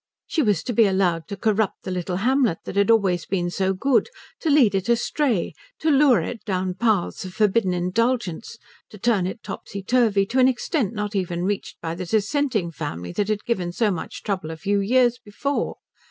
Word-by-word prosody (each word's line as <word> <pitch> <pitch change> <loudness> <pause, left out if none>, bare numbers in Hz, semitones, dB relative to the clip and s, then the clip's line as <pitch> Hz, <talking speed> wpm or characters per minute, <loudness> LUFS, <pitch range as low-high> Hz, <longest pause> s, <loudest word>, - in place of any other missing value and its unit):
She 320 - 0
was 205 - +1
to 245 - -3
be 225 -1 +5
allowed 180 -4 +1
to 200 - -6
corrupt 215 +1 0
the 185 - -4
little 180 0 -2
hamlet 240 -1 +2
that - - -6
had 200 +1 +2
always 190 -7 +2
been 175 -2 -1
so 190 +1 0
good, 260 - +1 0.3
to 325 - -1
lead 270 -8 +5
it 195 +3 -1
astray, 235 - +1 0.2
to 315 - +1
lure 275 -3 +5
it 230 - -6
down 185 -3 -1
paths 200 -1 0
of 185 -1 -8
forbidden 210 -2 +2
indulgence, 190 +3 -1 0.3
to 210 - -12
turn 205 -4 +1
it 200 +4 -7
topsy 200 0 -7
turvy 220 -3 +3
to 255 +6 -1
an 255 - +6
extent 250 - -1
not 210 0 -3
even 175 -2 -1
reached 200 +1 -3
by 165 - -3
the 180 +1 -6
Dissenting 220 - 0
family 85 - -5
that 205 - -1
had 215 -1 -2
given 185 -7 -1
so 210 +3 +1
much 170 -4 -6
trouble 190 -6 -2
a 160 - -6
few 200 +3 0
years 240 +3 +3
before. 260 +7 -2
205 Hz, 195 wpm, -23 LUFS, 185-235 Hz, 0.3 s, an